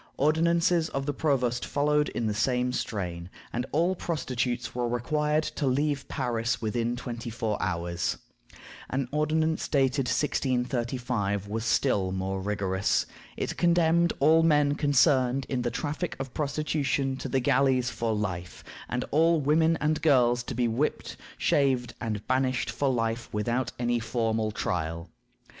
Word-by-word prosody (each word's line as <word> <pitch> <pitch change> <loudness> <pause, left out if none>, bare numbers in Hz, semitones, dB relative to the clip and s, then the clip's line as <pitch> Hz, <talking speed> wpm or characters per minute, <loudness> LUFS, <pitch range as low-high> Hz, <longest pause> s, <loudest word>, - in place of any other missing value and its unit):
Ordinances 165 +2 +2
of 135 0 -3
the 145 - -1
provost 125 -5 0
followed 150 +1 +1
in 115 - -3
the 105 - 0
same 125 +3 0
strain, 90 -7 -4 0.2
and 125 +2 -2
all 170 +5 +2
prostitutes 125 -8 -2
were 120 -1 -1
required 150 +6 0
to 145 - -2
leave 140 +1 0
Paris 120 -3 -1
within 115 +2 -1
twenty 120 -1 -6
four 110 -2 -2
hours. 85 -1 -1 0.7
An 135 -1 -1
ordinance 155 +2 0
dated 135 -2 +1
1635 125 -5 -1
was 110 +2 -3
still 100 -4 +1
more 95 0 -2
rigorous. 100 -1 0 0.3
It - - -3
condemned 170 -1 +3
all 160 +3 +5
men 150 -3 +3
concerned 135 -3 +3
in 130 -2 -1
the 120 - 0
"traffic 150 +8 -3
of 135 -2 -5
prostitution" 145 -2 -1
to - - -5
the 135 - +1
galleys 130 0 +2
for 115 -1 -2
life, 90 -5 -4 0.3
and 125 0 -2
all 165 +2 +4
women 160 +3 +3
and 150 0 0
girls 125 -6 +4
to - - -5
be 120 0 +1
"whipped, 120 +7 -1 0.2
shaved, 130 -4 +1
and 105 -3 -3
banished 130 0 0
for 140 - 0
life, 115 -1 -1
without 120 +5 -1
any 120 0 0
formal 110 -1 -1
trial." 85 -4 -3
125 Hz, 145 wpm, -27 LUFS, 115-150 Hz, 0.7 s, all